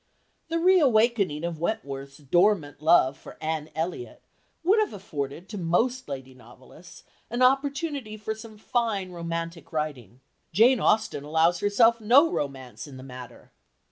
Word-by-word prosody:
The 330 +1 -1
re 370 +2 +5
awakening 220 - +2
of 170 -2 -3
Wentworth's 140 -8 -4
dormant 150 -1 +1
love 155 -4 +4
for - - -13
Anne 155 -1 -3
Elliot 175 - -4 0.4
would 395 +6 +4
have 430 - 0
afforded 160 -4 -6
to 210 - -6
most 230 +9 0
lady 130 -1 -7
novelists 130 +7 -16 0.3
an 240 +2 0
opportunity 275 -3 0
for 215 +1 -4
some 220 0 -12
fine, 220 -5 -1
romantic 165 -1 -5
writing. 145 -6 -4 0.3
Jane 230 +8 +5
Austen 215 -9 +1
allows 160 +3 +2
herself 225 +3 +3
no 270 +9 +5
romance 130 -4 -5
in 135 -2 -11
the 130 - -10
matter. 125 -2 -11
175 Hz, 140 wpm, -26 LUFS, 145-230 Hz, 0.4 s, re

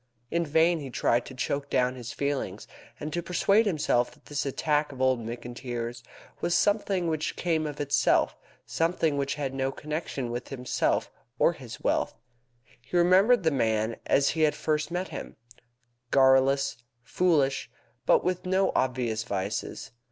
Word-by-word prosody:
In 170 -1 0
vain 160 +3 +3
he 140 -3 -6
tried 120 -1 +1
to 130 - -9
choke 140 +2 -2
down 125 0 +2
his 120 -2 -7
feelings, 140 -1 -3 0.3
and 150 0 -5
to 175 - -1
persuade 200 +5 +2
himself 145 -8 +1
that - - -24
this 145 -1 -2
attack 150 +2 0
of 135 - -11
old 130 -2 +2
McIntyre's 120 0 -5 0.4
was 175 - 0
something 200 -3 +2
which 155 -1 -1
came 160 -3 0
of 145 -1 -7
itself 145 0 +2 0.3
something 160 +6 0
which 140 0 -1
had 140 -2 -3
no 135 0 -1
connection 150 -5 -4
with 120 +1 -4
himself 125 -2 -1 0.3
or - - +4
his - - -10
wealth. - - 0 0.7
He 150 +8 -3
remembered 190 +6 +5
the 160 - +3
man 110 -4 +1
as 140 0 +3
he 160 - -1
had 155 -1 +3
first 155 0 -1
met 180 +2 -3
him, - - -7 0.7
garrulous, 135 +1 +4 0.3
foolish, 145 -2 +1 0.4
but - - +5
with 180 0 -1
no 190 +1 +2
obvious 125 -4 0
vices. 100 -2 -4
140 Hz, 155 wpm, -27 LUFS, 125-165 Hz, 0.7 s, remembered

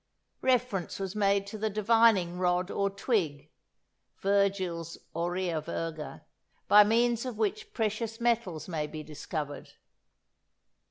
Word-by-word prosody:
Reference 250 -8 +1
was 195 0 -4
made 200 -1 +2
to 210 +2 -7
the 220 +1 0
divining 210 -4 +3
rod 180 +1 +1
or 200 0 +1
twig 175 - -1 0.7
(Virgil's 190 -4 0 0.2
"Aurea 175 -1 -1
virga"), 160 -1 -5 0.4
by 210 0 +9
means 235 +2 +2
of 250 -4 -5
which 425 - -1
precious 225 - -2
metals 230 -10 0
may 155 -4 -2
be 155 0 -7
discovered. 150 -1 -6
195 Hz, 115 wpm, -29 LUFS, 170-225 Hz, 0.7 s, by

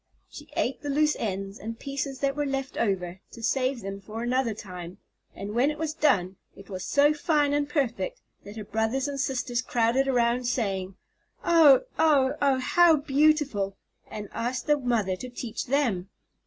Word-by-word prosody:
She - - -11
ate 260 +3 -1
the 290 - -5
loose 300 +2 +2
ends 195 -2 -4
and 225 +2 -6
pieces 275 0 -4
that 275 -1 +1
were 295 -1 -1
left 270 -1 -3
over, 190 -4 -1
to 230 - -10
save 260 0 0
them 195 0 -6
for 220 +3 -6
another 245 -2 0
time, 180 -4 -8 0.4
and 200 +1 -6
when 250 +5 +3
it 300 - -4
was 315 0 -2
done, 190 - +1 0.2
it 195 +1 -14
was 185 -1 -5
so 290 +7 +4
fine 295 -1 +1
and 290 0 0
perfect 295 - -1 0.2
that 205 +2 -10
her 215 - -5
brothers 225 +6 -1
and 280 -1 -4
sisters 255 -2 -1
crowded 245 +2 +1
around, 245 -1 +2
saying, 195 -6 -2 0.5
"Oh! 320 -6 +7 0.2
oh! 290 -5 +4
oh! 275 -2 +3
how 330 +6 +5
beautiful!" 285 -8 +2 0.3
and 210 -1 -6
asked 245 +2 -3
the 295 - +4
mother 230 -7 0
to 250 - -7
teach 245 -2 -5
them. 235 -9 0
255 Hz, 175 wpm, -27 LUFS, 210-285 Hz, 0.5 s, Oh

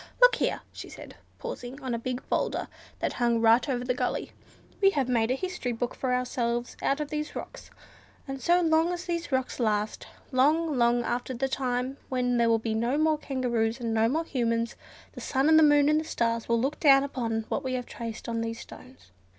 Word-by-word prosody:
Look - - +7
here!" - - 0
she - - -8
said, - - -11 0.2
pausing 270 - -7
on 260 -3 -4
a 235 - -1
big 250 +1 -4
boulder - - -1 0.3
that - - -2
hung 235 -1 +3
right 230 +4 +4
over 245 -2 -1
the 250 - +1
gully, - - -2 0.5
"we 390 - +7
have 265 -3 +2
made 230 -2 +1
a 255 - +2
history 360 -6 -3
book 240 +2 -3
for 260 - -2
ourselves 240 -1 -1
out 275 - +1
of 300 0 -4
these 300 0 -3
rocks; - - -8 0.6
and 270 0 -5
so 350 +1 +4
long 325 +1 +3
as 355 +1 -5
these 340 -3 -3
rocks 260 0 -1
last, 215 -2 -1 0.2
long 300 +4 +3
long 240 0 +3
after 245 +2 -2
the 270 +3 0
time 255 0 -2
when 250 -1 +1
there 235 -1 +3
will 225 - +4
be 225 0 -2
no 235 +5 0
more 310 0 +2
kangaroos, 240 -4 -1
and 230 -2 -2
no 225 0 +3
more 315 +6 0
humans, 230 -4 -1 0.4
the - - -9
sun, 265 +1 +1
and 315 0 +7
the - - +6
moon, 290 -1 +5
and 305 +1 +4
the - - -3
stars 230 -6 -1
will 235 0 +3
look 270 +5 -1
down 275 -3 +6
upon 230 -5 -2
what - - -1
we 260 -1 -2
have 250 -1 -2
traced 230 -2 -7
on 230 -1 -2
these 230 0 -4
stones." 255 - -13
255 Hz, 215 wpm, -28 LUFS, 235-290 Hz, 0.6 s, Look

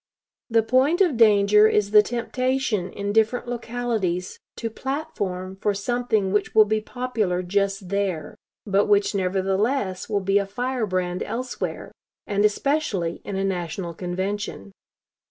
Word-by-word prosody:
The 225 -1 +3
point 260 +8 +3
of 345 -8 +3
danger 210 -1 +6
is 210 -1 +1
the 210 0 +8
temptation 240 -4 -1
in 200 0 -3
different 225 +3 +2
localities 230 -7 -2 0.2
to 230 -1 -4
'platform' 200 -10 -4
for 205 0 0
something 220 -2 0
which 210 - 0
will 215 -1 +8
be 215 +1 0
popular 215 -7 -2
just 195 0 -1
there, 190 -6 -2 0.3
but 200 -1 +2
which, 205 0 +3
nevertheless, 195 +2 0
will 205 -2 +1
be 195 +1 +2
a 200 - -2
firebrand 195 -6 -2
elsewhere, 250 +2 -4 0.3
and 205 -1 0
especially 210 - 0
in 200 - -5
a 195 - -1
national 175 -2 -3
convention. 190 +4 -4
205 Hz, 135 wpm, -24 LUFS, 190-235 Hz, 0.3 s, the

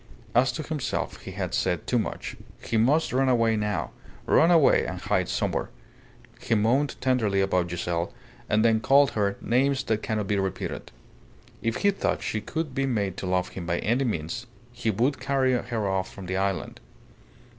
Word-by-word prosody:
As 125 +2 +4
to 155 - -4
himself, 150 -3 -3
he - - -8
had 90 -2 -3
said 90 -5 0
too 125 - +1
much. - - -4 0.2
He 115 - -4
must 135 +9 +3
run 130 +1 +3
away 115 -3 +3
now 105 -2 -1 0.3
run 165 - +5
away 165 -5 +5
and - - -4
hide - - 0
somewhere. - - -1 0.7
He 115 - 0
moaned 125 +7 +1
tenderly 115 -7 +1
about 90 -2 +1
Giselle, 85 0 -2 0.4
and 110 +1 +3
then 110 -1 +4
called 140 +4 +4
her 100 -2 0
names 130 +2 +2
that 110 -4 -1
cannot 110 -2 -1
be 100 0 0
repeated. 95 -1 -4 0.7
If 115 0 -1
he 200 - +6
thought 195 - -1
she 110 - -2
could 160 +3 -4
be 135 +1 0
made 100 -7 -1
to 95 - -4
love 90 0 0
him 85 -3 -7
by 85 0 0
any 120 +9 +1
means, 110 - -3 0.3
he 120 -2 -2
would 125 +7 +1
carry 135 -2 +1
her 120 -4 -1
off 95 -1 -1
from 95 - -9
the 95 +1 -3
island. 95 0 -2
110 Hz, 180 wpm, -26 LUFS, 95-130 Hz, 0.7 s, he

